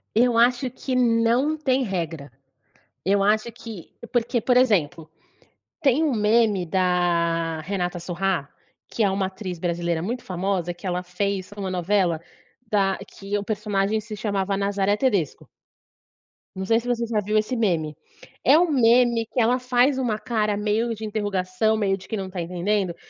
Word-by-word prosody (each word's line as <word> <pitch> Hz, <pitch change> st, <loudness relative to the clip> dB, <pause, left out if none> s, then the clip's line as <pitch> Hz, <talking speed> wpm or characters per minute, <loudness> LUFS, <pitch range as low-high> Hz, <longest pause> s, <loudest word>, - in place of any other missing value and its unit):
Eu 240 Hz, +1 st, +4 dB
acho 245 Hz, +2 st, +3 dB
que 255 Hz, +1 st, -4 dB
não 240 Hz, +5 st, +2 dB
tem 265 Hz, -3 st, +1 dB
regra. 165 Hz, -, -4 dB, 0.7 s
Eu 195 Hz, +1 st, +2 dB
acho 215 Hz, +3 st, +2 dB
que 225 Hz, -5 st, -10 dB, 0.2 s
porque, 240 Hz, 0 st, +1 dB
por 250 Hz, +1 st, +3 dB
exemplo, 180 Hz, -, +2 dB, 0.7 s
tem 275 Hz, +2 st, +3 dB
um 300 Hz, -, +1 dB
meme 210 Hz, -3 st, +3 dB
da 170 Hz, -2 st, +1 dB
Renata 180 Hz, +1 st, -3 dB
Sorrah, 175 Hz, -3 st, -1 dB, 0.4 s
que 230 Hz, -, -1 dB
é 200 Hz, -, +3 dB
uma 190 Hz, 0 st, 0 dB
atriz 190 Hz, -2 st, -6 dB
brasileira 170 Hz, -1 st, -1 dB
muito 240 Hz, +7 st, -3 dB
famosa, 180 Hz, -1 st, -2 dB
que 185 Hz, -, -10 dB
ela 180 Hz, 0 st, -1 dB
fez 190 Hz, +1 st, -3 dB
em 205 Hz, -, -8 dB
uma 190 Hz, -1 st, -3 dB
novela, 180 Hz, -2 st, +1 dB, 0.5 s
da 195 Hz, -3 st, +2 dB
que 200 Hz, +1 st, -5 dB
o 205 Hz, -, -5 dB
personagem 210 Hz, 0 st, 0 dB
se 215 Hz, 0 st, -8 dB
chamava 200 Hz, -2 st, -1 dB
Nazaré 200 Hz, 0 st, +1 dB
Tedesco 205 Hz, -, 0 dB, 1.1 s
não 190 Hz, 0 st, -4 dB
sei 225 Hz, +3 st, +3 dB
se 240 Hz, -, -9 dB
você 235 Hz, -1 st, 0 dB
já 225 Hz, -2 st, 0 dB
viu 210 Hz, +2 st, 0 dB
esse 215 Hz, +4 st, 0 dB
meme. 170 Hz, -9 st, 0 dB, 0.5 s
É 280 Hz, +4 st, +6 dB
um 345 Hz, -1 st, +3 dB
meme 240 Hz, -2 st, +4 dB
que 250 Hz, -, -3 dB
ela 245 Hz, +2 st, +3 dB
faz 250 Hz, +2 st, +2 dB
uma 240 Hz, -5 st, 0 dB
cara 215 Hz, -2 st, -1 dB
meio 215 Hz, +3 st, 0 dB
de 220 Hz, +1 st, -6 dB
interrogação, 205 Hz, 0 st, 0 dB
meio 195 Hz, -2 st, +1 dB
de 190 Hz, -, -14 dB
quem 220 Hz, -, -3 dB
não 190 Hz, -1 st, -4 dB
está 185 Hz, -1 st, -5 dB
entendendo, 180 Hz, +2 st, -1 dB
205 Hz, 165 wpm, -24 LUFS, 185-230 Hz, 1.1 s, É